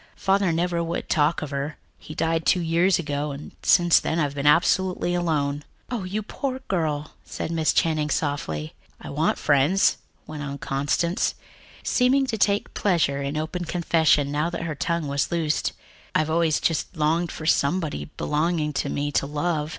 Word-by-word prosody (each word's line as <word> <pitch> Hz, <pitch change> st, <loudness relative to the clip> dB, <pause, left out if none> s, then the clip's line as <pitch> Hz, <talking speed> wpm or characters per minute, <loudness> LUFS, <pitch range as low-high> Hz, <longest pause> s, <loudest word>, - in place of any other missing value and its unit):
Father 195 Hz, -2 st, +2 dB
never 170 Hz, +1 st, 0 dB
would 170 Hz, +1 st, -4 dB
talk 155 Hz, +1 st, +2 dB
of 150 Hz, -, -6 dB
her. 140 Hz, +2 st, -3 dB, 0.2 s
He 155 Hz, -, -10 dB
died 165 Hz, 0 st, 0 dB
two 180 Hz, -, +3 dB
years 170 Hz, +2 st, +2 dB
ago, 145 Hz, -2 st, -2 dB
and 140 Hz, +1 st, -7 dB
since 175 Hz, -1 st, +5 dB
then 160 Hz, -, -2 dB
I've 145 Hz, -4 st, 0 dB
been 145 Hz, 0 st, -1 dB
absolutely 175 Hz, +3 st, +3 dB
alone." 150 Hz, -4 st, 0 dB, 0.3 s
"Oh, 225 Hz, -6 st, -2 dB
you 205 Hz, +4 st, -3 dB
poor 260 Hz, +4 st, -3 dB
girl," 155 Hz, -5 st, -1 dB
said -, -, -5 dB
Miss 160 Hz, -2 st, +2 dB
Channing 155 Hz, -2 st, +1 dB
softly. 80 Hz, -, -2 dB, 0.3 s
"I -, -, -8 dB
want -, -, +1 dB
friends," 150 Hz, +7 st, +3 dB, 0.3 s
went 155 Hz, -1 st, -7 dB
on 140 Hz, -1 st, -5 dB
Constance, 145 Hz, +6 st, 0 dB, 0.5 s
seeming 265 Hz, +2 st, +3 dB
to 230 Hz, -4 st, -2 dB
take 200 Hz, 0 st, +2 dB
a -, -, -27 dB
pleasure 160 Hz, -8 st, +1 dB
in 140 Hz, +2 st, -3 dB
open 160 Hz, +3 st, -3 dB
confession 160 Hz, -4 st, +2 dB
now 150 Hz, +3 st, 0 dB
that 170 Hz, -1 st, -4 dB
her 165 Hz, -2 st, -3 dB
tongue 170 Hz, +1 st, -2 dB
was 140 Hz, +2 st, -1 dB
loosed. 165 Hz, -3 st, 0 dB, 0.4 s
"I've 155 Hz, 0 st, +2 dB
always 165 Hz, -2 st, +2 dB
just 165 Hz, +2 st, -1 dB
longed 160 Hz, +3 st, +1 dB
for 155 Hz, -, -7 dB
somebody 160 Hz, +1 st, +1 dB
belonging 155 Hz, 0 st, 0 dB
to -, -, -1 dB
me 145 Hz, 0 st, -2 dB
to 140 Hz, -, 0 dB
love. 150 Hz, +1 st, -1 dB
160 Hz, 175 wpm, -24 LUFS, 145-175 Hz, 0.5 s, since